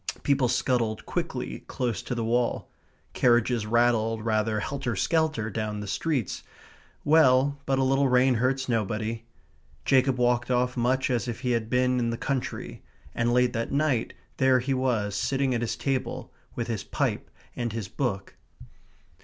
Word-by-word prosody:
People 140 -3 +2
scuttled 120 -3 0
quickly 60 0 -3
close 120 -4 -2
to 125 - -4
the 115 - -2
wall; 120 +1 0 0.4
carriages 120 -2 +2
rattled 115 -1 +2
rather 110 -1 +1
helter 135 +1 -3
skelter 150 - 0
down 105 -1 -3
the 105 - -5
streets. 130 - -2 0.6
Well, 140 -2 +4
but 135 0 +2
a 135 - +2
little 135 +1 +2
rain 125 +1 +4
hurts 130 +3 0
nobody. 115 -1 -1 0.6
Jacob 130 -1 +3
walked 120 0 +1
off 125 0 +1
much 130 +2 +1
as 125 0 0
if 120 - -5
he 125 -2 0
had 115 -2 -1
been 125 0 +2
in 120 -1 0
the 115 - -2
country; 135 0 -4 0.3
and 120 0 0
late 125 0 +3
that 115 0 -2
night 140 -5 0 0.2
there 130 -1 +4
he 130 +2 -1
was 120 -6 0
sitting 135 +3 0
at 120 - -1
his 120 - -1
table 135 -2 -3 0.2
with 120 - -2
his 115 -3 -3
pipe - - -2 0.3
and 120 -1 -2
his 110 -3 -4
book. 100 -5 -3
125 Hz, 160 wpm, -27 LUFS, 115-130 Hz, 0.6 s, Well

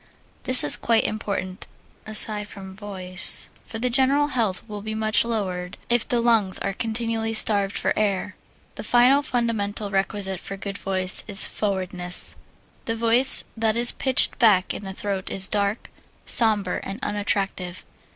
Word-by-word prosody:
This 255 0 +5
is 145 - +7
quite 230 -1 +1
important, 200 -3 -5 0.4
aside 215 -1 +1
from 190 -2 -11
voice, 190 -3 0
for 225 - -9
the 250 +2 -2
general 275 +3 +2
health 225 -6 -2
will 210 -2 -8
be 220 +1 -6
much 215 0 +1
lowered 190 -5 -4
if 240 -1 +1
the 240 - 0
lungs 225 -5 +2
are 195 - -4
continually 225 +1 -3
starved 200 -2 +2
for - - -1
air. 205 -1 -2 0.4
The - - -7
final 250 +3 +3
fundamental 220 -6 -3
requisite 195 -1 -3
for 195 - -8
good 200 +1 -7
voice 185 -1 -1
is 205 -2 +4
3. - - -9
Forwardness 185 -3 -1 0.5
A 225 - -2
voice 230 +3 +7
that 220 -1 -1
is 240 +1 +5
pitched 260 -2 +1
back 205 -6 +3
in 205 - -8
the 190 - -7
throat 195 -1 -4
is 195 0 -2
dark, 205 +1 -2 0.3
sombre, 210 -5 +2
and 195 - -7
unattractive. 195 -3 -3
210 Hz, 155 wpm, -22 LUFS, 195-230 Hz, 0.5 s, is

